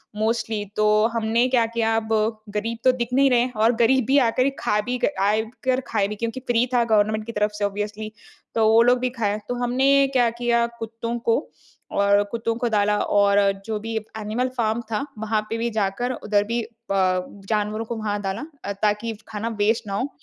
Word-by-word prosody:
Mostly 220 Hz, 0 st, -1 dB
तो 215 Hz, -, +2 dB, 0.3 s
हमने 230 Hz, +2 st, +2 dB
क्या 245 Hz, -3 st, +3 dB
किया 225 Hz, -1 st, 0 dB
अब 220 Hz, -1 st, -3 dB, 0.5 s
गरीब 225 Hz, +2 st, -2 dB
तो 255 Hz, -, +6 dB
दिख 240 Hz, -2 st, -3 dB
नहीं 275 Hz, +1 st, +5 dB
रहे 245 Hz, -2 st, +4 dB
हैं 250 Hz, +1 st, -1 dB
और 230 Hz, +2 st, +5 dB
गरीब 250 Hz, 0 st, +3 dB
ही 275 Hz, -, +5 dB
आकर 255 Hz, +1 st, +2 dB
खा 210 Hz, -, +1 dB
भी 250 Hz, 0 st, -2 dB, 0.2 s
आए 210 Hz, +2 st, +3 dB, 0.2 s
कर 255 Hz, 0 st, +2 dB
खाए 205 Hz, -3 st, +1 dB
भी 210 Hz, -, -5 dB
क्योंकि 230 Hz, +4 st, -4 dB
फ्री 240 Hz, 0 st, +3 dB
था 245 Hz, -1 st, +4 dB
गवर्नमेंट 215 Hz, -1 st, +2 dB
की 230 Hz, -, -5 dB
तरफ 210 Hz, -1 st, 0 dB
से 210 Hz, -1 st, -1 dB
ऑब्वियसली 210 Hz, +2 st, -4 dB, 0.4 s
तो 220 Hz, -1 st, +3 dB
वो 225 Hz, +1 st, +6 dB
लोग 245 Hz, +1 st, +4 dB
भी 255 Hz, 0 st, 0 dB
खाए। 210 Hz, -1 st, 0 dB
तो 245 Hz, -, -1 dB
हमने 270 Hz, +3 st, +3 dB
क्या 245 Hz, -3 st, +4 dB
किया 235 Hz, -1 st, +2 dB
कुत्तों 230 Hz, +1 st, -4 dB
को 230 Hz, -1 st, +2 dB, 0.5 s
और 200 Hz, 0 st, +3 dB
कुत्तों 230 Hz, 0 st, -2 dB
को 240 Hz, 0 st, -1 dB
डाला 210 Hz, -1 st, +2 dB, 0.2 s
और 200 Hz, 0 st, +4 dB, 0.3 s
जो 220 Hz, -1 st, -3 dB
भी 225 Hz, +1 st, -5 dB, 0.2 s
एनिमल 220 Hz, +4 st, -2 dB
फार्म 225 Hz, 0 st, 0 dB
था 215 Hz, +5 st, -1 dB
वहाँ 220 Hz, 0 st, 0 dB
पे 225 Hz, -, -2 dB
भी 235 Hz, +1 st, -1 dB
जाकर 220 Hz, +3 st, -1 dB
उधर 210 Hz, -4 st, 0 dB
भी 235 Hz, +1 st, -1 dB, 0.3 s
प 185 Hz, 0 st, 0 dB
जानवरों 215 Hz, +1 st, -1 dB
को 235 Hz, -, -4 dB
वहाँ 210 Hz, -2 st, -2 dB
डाला 195 Hz, +8 st, -3 dB, 0.2 s
अ, 200 Hz, -, -2 dB
ताकि 215 Hz, +2 st, 0 dB
खाना 215 Hz, +1 st, -4 dB
वेस्ट 215 Hz, +1 st, +1 dB
ना 200 Hz, -, -4 dB
हो। 250 Hz, +8 st, -1 dB
225 Hz, 200 wpm, -23 LUFS, 210-235 Hz, 0.5 s, तो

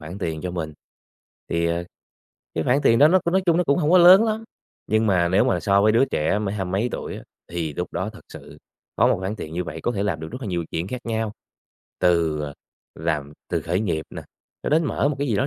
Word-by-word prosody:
khoản 80 Hz, +5 st, -8 dB
tiền 80 Hz, -5 st, -3 dB
cho 90 Hz, -, -3 dB
mình. 80 Hz, -3 st, -4 dB, 0.8 s
Thì 85 Hz, 0 st, 0 dB, 0.9 s
cái 80 Hz, -, -1 dB
khoản 125 Hz, +3 st, +3 dB
tiền 115 Hz, -, +4 dB
đó 150 Hz, -, +7 dB
nó 185 Hz, +3 st, +5 dB
c -, -, -27 dB
nói 185 Hz, +2 st, +2 dB
chung 170 Hz, -1 st, +4 dB
nó 180 Hz, -, +2 dB
cũng 140 Hz, +4 st, +2 dB
hông 150 Hz, -2 st, +1 dB
có 185 Hz, -, +7 dB
lớn 185 Hz, +5 st, +8 dB
lắm, 220 Hz, 0 st, -2 dB, 0.4 s
nhưng 110 Hz, +1 st, +2 dB
mà 90 Hz, -3 st, +3 dB
nếu 95 Hz, +3 st, +3 dB
mà 90 Hz, -2 st, +1 dB
so 100 Hz, +2 st, +3 dB
với 110 Hz, +1 st, +4 dB
đứa 120 Hz, +4 st, +4 dB
trẻ 100 Hz, -, 0 dB
mới 100 Hz, -1 st, -2 dB
hai 100 Hz, -2 st, -2 dB
mấy 95 Hz, +7 st, 0 dB
tuổi -, -, -5 dB
á -, -, -9 dB, 0.3 s
thì 80 Hz, -4 st, -3 dB
lúc 90 Hz, -, -4 dB
đó 95 Hz, +5 st, -2 dB
thật 105 Hz, -, -13 dB
sự -, -, -12 dB, 0.4 s
có -, -, +4 dB
một -, -, +3 dB
khoản 95 Hz, +3 st, -4 dB
tiền 80 Hz, -6 st, -7 dB
như 90 Hz, +1 st, -2 dB
vậy 80 Hz, -1 st, -7 dB
có 120 Hz, -, 0 dB
thể 100 Hz, -, -2 dB
làm 95 Hz, -6 st, -1 dB
được 80 Hz, -, -6 dB
rất 125 Hz, -, -6 dB
là -, -, -4 dB
nhiều 85 Hz, -2 st, -2 dB
chuyện 85 Hz, +4 st, -3 dB
khác 125 Hz, -, -4 dB
nhau. 110 Hz, -2 st, -2 dB, 0.7 s
Từ 85 Hz, -4 st, +2 dB, 0.5 s
làm 75 Hz, -2 st, -2 dB, 0.2 s
từ -, -, -1 dB
khởi 90 Hz, +3 st, -1 dB
nghiệp 85 Hz, -7 st, -1 dB
nè, -, -, -7 dB, 0.4 s
cho -, -, -2 dB
đến 160 Hz, +2 st, +3 dB
mở 140 Hz, -, 0 dB
một 145 Hz, -, -2 dB
cái 145 Hz, -, 0 dB
gì 110 Hz, -, +1 dB
đó 130 Hz, -, +1 dB
100 Hz, 255 wpm, -23 LUFS, 85-125 Hz, 0.9 s, lớn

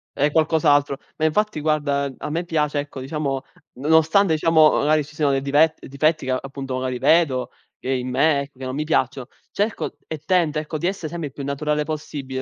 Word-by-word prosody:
È 145 Hz, +1 st, +2 dB
qualcos'altro. 150 Hz, -3 st, +3 dB, 0.2 s
Ma 155 Hz, -, 0 dB
infatti 170 Hz, +1 st, 0 dB
guarda, 145 Hz, -2 st, 0 dB
ehm, 135 Hz, -2 st, -6 dB
a -, -, -5 dB
me 165 Hz, +3 st, -1 dB
piace 150 Hz, -3 st, 0 dB
ecco 145 Hz, -2 st, -6 dB
diciamo, 135 Hz, 0 st, -3 dB, 0.3 s
nonostante 160 Hz, +6 st, +3 dB
diciamo 155 Hz, 0 st, +5 dB
magari 150 Hz, +1 st, +2 dB
ci 155 Hz, +2 st, -15 dB
siano 140 Hz, -3 st, +2 dB
dive 145 Hz, +4 st, +3 dB
difetti 155 Hz, +2 st, 0 dB
che 130 Hz, -, -1 dB
appunto 135 Hz, 0 st, -4 dB
magari 130 Hz, 0 st, -2 dB
vedo, 130 Hz, -2 st, +2 dB, 0.3 s
che 130 Hz, -, -4 dB
in 130 Hz, -1 st, -1 dB
me, 140 Hz, +2 st, +2 dB
che 130 Hz, -1 st, -12 dB
non 130 Hz, -, -4 dB
mi 150 Hz, +3 st, -1 dB
piacciono, 130 Hz, -4 st, 0 dB, 0.2 s
cerco 210 Hz, +3 st, -2 dB
e 160 Hz, -, -4 dB
tento 170 Hz, -5 st, +2 dB
ecco, 155 Hz, +1 st, -4 dB
di 175 Hz, -, 0 dB
essere 185 Hz, -5 st, -3 dB
sempre 170 Hz, -2 st, -4 dB
il 135 Hz, -, -12 dB
più 140 Hz, -, -7 dB
naturale 150 Hz, +2 st, -1 dB
possibile, 145 Hz, -4 st, -5 dB
150 Hz, 195 wpm, -22 LUFS, 135-160 Hz, 0.3 s, diciamo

